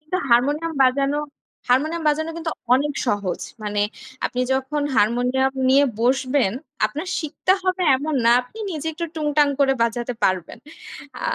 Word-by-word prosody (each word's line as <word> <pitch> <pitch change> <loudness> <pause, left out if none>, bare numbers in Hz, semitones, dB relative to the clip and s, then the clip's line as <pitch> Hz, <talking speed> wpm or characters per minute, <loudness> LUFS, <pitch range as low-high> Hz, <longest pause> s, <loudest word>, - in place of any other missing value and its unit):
কিন্তু, 310 +4 -3
হারমোনিয়াম 290 +7 +2
বাজানো, 275 +2 +2 0.5
হারমোনিয়াম 310 +7 +1
বাজানো 315 +2 0
কিন্তু 330 -1 -3 0.2
অনেক 290 +3 +1
সহজ। 205 -5 -1 0.2
মানে, 205 -1 -2 0.5
আপনি 250 - -4
যখন 265 +3 -1
হারমোনিয়াম 250 +5 +2 0.2
নিয়ে 275 +2 +5 0.2
বসবেন, 255 -2 +2 0.3
আপনার 300 - -6
শিখতে 315 +4 0
হবে 370 0 0
এমন 300 +3 -3
না, 230 - +6
আপনি 250 - -15
নিজে 315 -3 -5
একটু 335 +2 -4
টুংটাং 295 -2 +2
করে 270 -1 +4
বাজাতে 240 +1 -1
পারবেন। 185 +2 -1 0.6
আ - - -10
275 Hz, 145 wpm, -22 LUFS, 245-305 Hz, 0.6 s, না